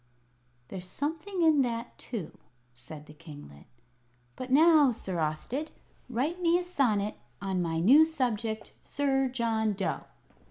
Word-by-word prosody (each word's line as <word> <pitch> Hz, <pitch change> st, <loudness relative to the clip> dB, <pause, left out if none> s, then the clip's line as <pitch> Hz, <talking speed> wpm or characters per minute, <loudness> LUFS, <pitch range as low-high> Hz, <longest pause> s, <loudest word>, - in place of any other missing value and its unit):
"There's 180 Hz, -1 st, -7 dB
something 330 Hz, -, -3 dB
in 310 Hz, -3 st, +5 dB
that, 235 Hz, -2 st, -3 dB
too," 220 Hz, -9 st, -6 dB, 0.4 s
said 145 Hz, +5 st, -11 dB
the 150 Hz, -, -14 dB
kinglet. 145 Hz, -, -13 dB, 0.7 s
"But 255 Hz, -, -7 dB
now, 300 Hz, 0 st, +6 dB
Sir 190 Hz, -6 st, -4 dB
Austed, 160 Hz, -, -2 dB, 0.4 s
write 285 Hz, +9 st, -2 dB
me 340 Hz, 0 st, +4 dB
a 360 Hz, -, -2 dB
sonnet 225 Hz, -, 0 dB, 0.2 s
on 190 Hz, -2 st, -2 dB
my 165 Hz, -1 st, -1 dB
new 260 Hz, -, +7 dB
subject, 235 Hz, -8 st, -2 dB
Sir 270 Hz, -2 st, 0 dB
John 225 Hz, -4 st, 0 dB
Dough." 180 Hz, -8 st, -3 dB
235 Hz, 130 wpm, -29 LUFS, 180-290 Hz, 0.7 s, new